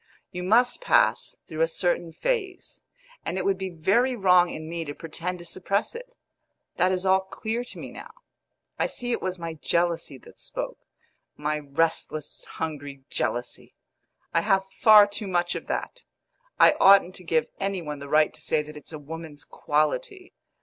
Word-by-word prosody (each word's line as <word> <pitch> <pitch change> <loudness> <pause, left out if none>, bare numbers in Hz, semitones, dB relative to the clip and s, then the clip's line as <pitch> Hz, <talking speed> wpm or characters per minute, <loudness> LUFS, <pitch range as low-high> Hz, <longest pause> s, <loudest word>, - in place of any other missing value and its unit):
You 180 - -5
must 240 - +3
pass - - +3
through 160 0 -4
a 165 - +5
certain 175 0 -1
phase, 390 - -3 0.4
and - - -3
it 190 - -2
would 195 -1 +1
be 190 0 -3
very 200 +10 +2
wrong 180 -4 +5
in 155 -1 -7
me 165 0 -3
to 145 -2 -7
pretend 170 +3 -5
to 175 - -11
suppress 195 +4 -1
it. - - -10 0.6
That 185 +1 +3
is 185 0 -1
all 190 0 +5
clear 220 +5 -4
to - - -8
me - - -7
now; - - -10 0.7
I - - +2
see 245 0 -3
it - - -1
was 185 0 -2
my 165 -1 -5
jealousy 165 -2 -1
that - - -17
spoke - - -5 0.6
my 150 0 -1
restless, 155 +1 -1
hungry 145 -3 -6
jealousy. 120 0 -3 0.6
I 165 - +3
have 195 0 +2
far 215 -2 +9
too 205 +1 -5
much 175 -1 +1
of - - -6
that; - - -4 0.6
I - - +8
oughtn't 195 -2 +7
to 185 - -12
give 160 -2 +1
any 195 -2 -2
one 150 -2 -5
the 140 0 -8
right 155 +1 +4
to - - -11
say 155 -1 +1
that 150 0 -11
it's 150 - -6
a - - -4
woman's 155 0 -9
quality. 365 - -1
175 Hz, 175 wpm, -26 LUFS, 155-195 Hz, 0.7 s, far